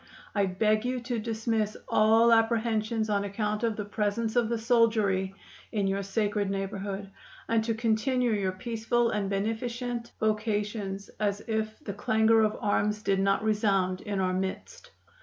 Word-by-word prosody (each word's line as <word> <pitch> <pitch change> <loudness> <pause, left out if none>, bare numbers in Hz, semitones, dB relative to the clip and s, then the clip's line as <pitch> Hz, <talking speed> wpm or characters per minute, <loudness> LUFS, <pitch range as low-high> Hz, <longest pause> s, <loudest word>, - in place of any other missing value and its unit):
I 200 -2 +2
beg 215 +3 +1
you 250 +1 -1
to 240 -1 -2
dismiss 220 -1 -1
all 225 +2 +5
apprehensions 225 -1 +1
on 205 -1 +1
account 210 +1 -2
of 230 -2 0
the 210 - -4
presence 210 +2 -1
of 235 -2 +2
the 235 - 0
soldiery 220 -5 +2 0.4
in 205 -3 0
your 195 +1 0
sacred 205 0 -1
neighborhood, 195 0 -4 0.4
and 225 -1 +2
to 230 -1 0
continue 235 +2 +1
your 200 -3 0
peaceful 230 +3 0
and 205 -3 -1
beneficent 235 +4 -3
vocations 210 -2 -1
as 205 -1 0
if 220 -1 -2
the 200 - -4
clangor 220 +2 +3
of 215 -1 +1
arms 210 +1 0
did 195 -1 +1
not 195 +1 +2
resound 195 -4 +1
in 205 -2 -3
our 185 -1 +1
midst. 190 - -4
215 Hz, 155 wpm, -28 LUFS, 200-225 Hz, 0.4 s, all